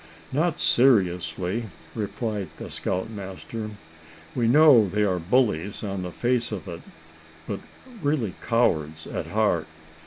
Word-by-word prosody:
"Not 160 +4 +1
seriously," 95 -4 +2 0.3
replied 105 -2 -3
the - - -8
scoutmaster. 100 +3 -4 0.6
"We 120 -2 +1
know 135 -4 +7
they 105 +3 +1
are 95 -3 +1
bullies 100 -1 +1
on 100 -2 -3
the 90 - -4
face 120 +3 0
of 100 -2 -5
it, 85 -2 -6 0.7
but - - -3 0.4
really 145 - 0
cowards 80 -10 +1
at - - -4
heart. 100 -7 +1
105 Hz, 120 wpm, -25 LUFS, 90-120 Hz, 0.7 s, know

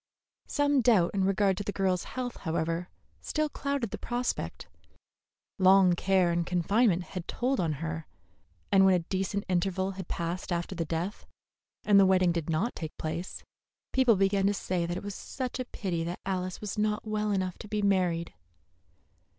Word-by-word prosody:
Some 285 -2 +2
doubt 215 -8 +4
in 195 -1 +1
regard 195 -1 +2
to 205 - -3
the 205 - -3
girl's 190 -2 0
health, 250 -2 -5
however, 165 +1 -2 0.3
still 305 -1 -1
clouded 280 -7 -2
the - - -5
prospect. 245 +1 -3 0.9
Long 190 -1 +6
care 185 0 +2
and 170 0 +1
confinement 180 +2 +2
had 180 0 -7
told 260 +2 0
on 165 -3 +1
her; 160 +2 -5 0.6
and 195 -1 +6
when 190 -1 +6
a 170 -2 -1
decent 195 +2 -2
interval 190 +1 0
had 190 -2 -7
passed 170 +3 -3
after 175 +2 -2
the 170 -2 -2
death, 170 +6 -4 0.6
and 205 -1 +6
the 195 - +6
wedding 185 -2 +4
did 170 -2 -3
not 165 +10 0
take 160 -2 -6
place, 165 +3 -4 0.5
people 255 -4 +5
began 195 0 +2
to 205 - +1
say 180 -3 -1
that 175 +1 -2
it - - -6
was 205 0 -5
such 255 +5 -5
a 255 - -2
pity 180 -8 -3
that 175 +2 -4
Alice 185 -1 -2
was 210 0 -4
not 210 +1 0
well 215 0 -1
enough 185 -2 -1
to 215 - -8
be 210 0 -2
married. 180 -4 +1
190 Hz, 175 wpm, -29 LUFS, 175-210 Hz, 0.9 s, Long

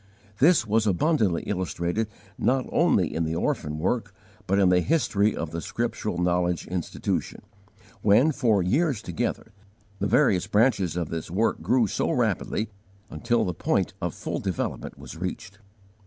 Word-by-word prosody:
This 160 +2 +5
was 110 0 +1
abundantly 105 - +2
illustrated 90 +2 -2 0.3
not 130 +3 +1
only - - +2
in 85 - 0
the 80 0 -2
orphan 75 -2 -1
work, 100 +3 -1 0.3
but 95 - +2
in 95 -2 +4
the 90 0 +4
history 110 - +1
of 80 -2 -4
the 85 0 -4
Scriptural 85 - -3
Knowledge 90 0 0
Institution; 90 -2 -3 0.6
when, 115 +10 +5
for 115 -9 +2
years 135 - +1
together, 90 +5 -3 0.5
the - - 0
various 90 0 +3
branches 105 -5 +2
of 85 -3 -2
this 80 -1 -5
work 105 +7 0
grew 125 -2 +3
so 100 - -1
rapidly, 110 0 0 0.4
until 120 0 0
the 90 - -2
point - - 0
of - - -2
full - - -4
development - - -3
was - - -10
reached. 95 +3 -6
100 Hz, 150 wpm, -26 LUFS, 90-115 Hz, 0.6 s, This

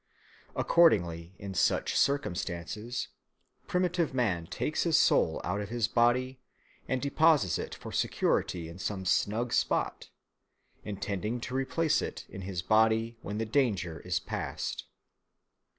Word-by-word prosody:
Accordingly, 90 - +3
in 100 -1 -7
such 80 - +1
circumstances, 105 - -1 0.6
primitive 180 -5 0
man 95 -10 0
takes - - -2
his - - +3
soul - - +3
out 95 +5 -1
of 100 - -6
his 120 -1 0
body 125 +3 +2 0.5
and 130 - 0
deposits 140 - +3
it - - -5
for - - -9
security 85 -3 0
in 85 +3 -10
some 95 -1 -3
snug 110 +6 +1
spot, - - 0 0.7
intending 105 +3 -3
to 125 - -5
replace 145 +4 +1
it - - -5
in 95 - -8
his 90 -2 -4
body 110 +2 +2
when 100 +1 -5
the 115 - -1
danger 105 - 0
is 90 -1 -1
past. - - -4
110 Hz, 130 wpm, -30 LUFS, 95-130 Hz, 0.7 s, Accordingly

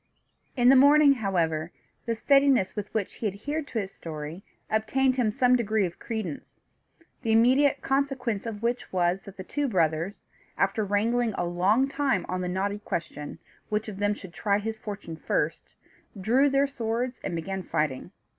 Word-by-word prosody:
In 245 0 +5
the 270 - +8
morning, 285 +2 +7
however, 170 - -1 0.4
the 230 - 0
steadiness 275 -4 +3
with 210 -1 -5
which 215 -4 -2
he 220 - -3
adhered 285 +10 -4
to 235 - -5
his 195 -2 -4
story 155 +2 -7 0.3
obtained 255 +5 +1
him 245 -4 +2
some 250 +2 +3
degree 220 -4 +1
of 175 -1 -7
credence; 220 -10 -5 0.6
the 225 -3 -1
immediate 255 +5 +4
consequence 265 -6 -1
of 215 -1 -6
which 240 +1 -1
was, 180 +1 +1
that 200 - -11
the 190 - -6
two 290 +8 -2
brothers, 170 - 0 0.3
after 220 - +1
wrangling 220 +3 +1
a - - 0
long 190 +9 +2
time 275 -1 0
on 185 0 -2
the 180 - -2
knotty 200 +3 -1
question, 165 -7 -5 0.3
which 215 +1 -1
of 200 -2 -7
them 205 0 +1
should 190 -4 -11
try 200 +1 +1
his 220 +1 -4
fortune 200 -7 -7
first, - - -2 0.5
drew 250 +9 +3
their 275 +1 +3
swords 245 -1 -3
and 175 - -3
began 190 +3 -3
fighting. 150 -6 -2
215 Hz, 170 wpm, -27 LUFS, 185-255 Hz, 0.6 s, the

